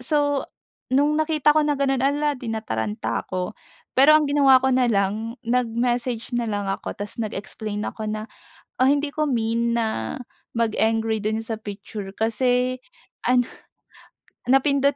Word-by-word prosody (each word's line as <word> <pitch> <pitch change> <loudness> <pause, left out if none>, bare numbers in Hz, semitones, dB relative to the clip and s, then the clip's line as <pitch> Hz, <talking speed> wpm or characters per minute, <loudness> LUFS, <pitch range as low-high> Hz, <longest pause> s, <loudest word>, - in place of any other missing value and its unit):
so 290 +1 +1 0.5
no'ng 295 +3 +3
nakita 310 -2 +3
ko 305 - +5
na 295 - +2
gano'n, 270 -1 +1
ala, 290 +1 +1
eh, - - -14
di 245 - -8
nataranta 110 - -2
ako. 185 +2 -4 0.4
Pero 280 +4 +7
ang 305 -1 +2
ginawa 275 -3 +6
ko 265 - +3
nalang 225 -2 +1
nag-message 240 0 0
nalang 210 -4 -1
ako 195 - -4
tas 205 0 -5
nag-explain 210 0 -4
ako 215 -1 -5
na, 215 +1 -4 0.6
ah, 260 - +6
hindi 285 +1 +2
ko 305 - +1
mean 235 0 0
na 220 - -2 0.4
mag-angry 225 -1 +1
do'n 220 +1 0
sa 225 0 -3
picture 205 -1 -7
kasi 250 +3 +1 0.5
ano 245 -1 +4 1.0
napindot 280 +1 +3
235 Hz, 140 wpm, -23 LUFS, 215-270 Hz, 1.0 s, Pero